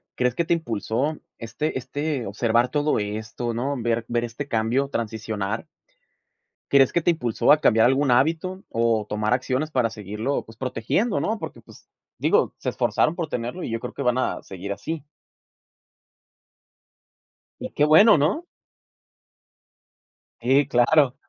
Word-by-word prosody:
¿crees 125 -1 0
que 170 - 0
te 170 - +2
impulsó, 135 0 -2 0.2
este 125 +6 -3
este 145 0 -3
observar 115 +4 +1
todo 150 -4 +1
esto, 110 +3 -4
no? 135 +5 -2
Ver 115 0 0
ver 120 0 0
este 120 +5 -6
cambio, 120 +4 0
transicionar 110 -3 -3 1.1
¿crees 135 -2 +5
que 170 - +2
te 175 - +3
impulsó 120 -9 +1
a 150 +1 +7
cambiar 115 -3 +5
algún 135 +1 +2
hábito 165 +9 +1
o 115 -2 +1
tomar 105 +1 -1
acciones 130 +4 0
para 125 -5 +1
seguirlo, 110 +5 -3
pues, 115 - -15
protegiendo, 130 - -1
no? 220 +1 -1
Porque, - - -7
pues, - - -18 0.3
digo, - - +2
se - - -4
esforzaron 155 - +1
por 170 -3 -3
tenerlo 125 +9 -4
y - - -4
yo 115 0 -2
creo 125 - -7
que 140 - -4
van 125 0 +1
a 130 - -1
seguir 95 +1 -6
así. 160 +7 -5 2.6
Y - - -5
qué 145 - +2
bueno, 165 +7 +7
¿no? 175 - +1 2.0
Sí, 130 +3 +3
claro. 130 +2 +4
125 Hz, 145 wpm, -24 LUFS, 115-150 Hz, 2.6 s, a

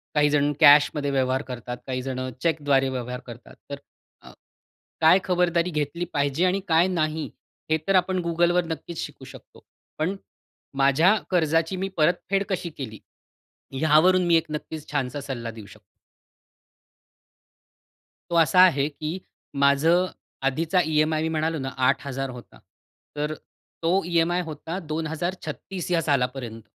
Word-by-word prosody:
काहीजण 150 -1 +3
कॅशमध्ये 145 -1 +5
व्यवहार 130 -1 +1
करतात, 125 -2 -7
काही 130 -1 -2
जणं 130 0 -4
चेकद्वारे 145 -5 +1
व्यवहार 125 -1 -4
करतात, 120 0 -12
तर 140 - -5 0.4
अ, - - -14 0.7
काय 160 +4 +6
खबरदारी 175 -1 +1
घेतली 150 +2 -2
पाहिजे 145 +4 +1
आणि 185 +2 +1
काय 165 +2 +4
नाही, 155 -3 -1 0.4
हे 160 - +3
तर 195 - +3
आपण 185 0 +2
Googleवर 175 +1 +2
नक्कीच 165 +1 -6
शिकू - - -12
शकतो. - - -15 0.3
पण 165 +6 -1 0.6
माझ्या 140 +9 +4
कर्जाची 165 0 +1
मी 190 +1 -2
परतफेड 180 +5 +1
कशी 180 -3 -2
केली, 110 -6 -7 0.8
यावरून 160 +4 +4
मी 170 - +5
1 165 - +1
नक्कीच 155 0 -6
छानसा 140 -1 -2
सल्ला 120 -4 -5
देऊ 110 -2 -11
शकतो. 105 - -16 2.5
तो 170 - -1
असा 165 +3 +4
आहे 145 -6 +4
की 155 +3 -5 0.5
माझं 160 +6 +4 0.4
आधीचा 165 +6 +1
ई-एम-आय 155 0 +1
मी 160 - 0
म्हणालो 160 0 -1
ना, 135 0 -3
8000 135 +1 0
होता. 125 -1 -12 0.6
तर 150 +1 -2 0.5
तो 180 +4 +2
ई-एम-आय 175 +1 +1
होता 160 +3 -6
2036 165 +3 -4
ह्या 170 -1 +2
सालापर्यंत. 125 -5 -1
155 Hz, 130 wpm, -24 LUFS, 135-170 Hz, 2.5 s, काय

